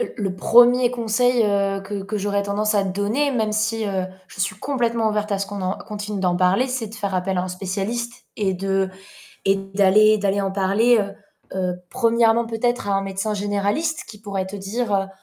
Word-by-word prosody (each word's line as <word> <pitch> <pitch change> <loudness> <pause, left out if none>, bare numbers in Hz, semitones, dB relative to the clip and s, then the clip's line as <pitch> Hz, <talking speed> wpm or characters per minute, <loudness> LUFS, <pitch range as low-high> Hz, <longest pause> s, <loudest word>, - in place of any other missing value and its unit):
heu, 475 - -3
le 190 -2 -2
1er 245 +3 +5
conseil, 245 +1 +2
heu, 200 -1 +1
que 195 0 -5
que 210 +2 -3
j'aurais 200 0 0
tendance 210 +2 0
à 200 -1 +3
donner, 205 +9 0
même 220 -4 0
si, 220 0 0
heu, 190 -2 -1 0.2
je - - -14
suis 195 +2 0
complètement 235 -3 0
ouverte 210 0 -1
à 200 - 0
ce 200 - -2
qu'on 200 -1 -6
en 185 +1 -2
continue 210 -1 -5
d'en 180 -2 +1
parler, 185 +7 +3
c'est 250 -4 -3
de 220 - -10
faire 200 -3 -3
appel 185 0 0
à - - +1
un 185 - -4
spécialiste 200 +6 -4
et 200 -3 0
de 195 0 -1 0.5
et 195 0 +3
d'aller 195 +2 +4
d'aller 200 -1 0
en 195 -1 -1
parler, 205 +5 +3
heu, 200 -1 -2 0.4
heu, 180 -1 0 0.2
1° 230 -1 +3
peut-être 235 0 -1
à 200 - +1
un 195 - +2
médecin 195 +2 -2
généraliste 205 +10 -1
qui 215 -1 -11
pourrait 200 -3 -3
te 195 - -7
dire, 200 -1 -1
205 Hz, 200 wpm, -22 LUFS, 195-225 Hz, 0.5 s, 1er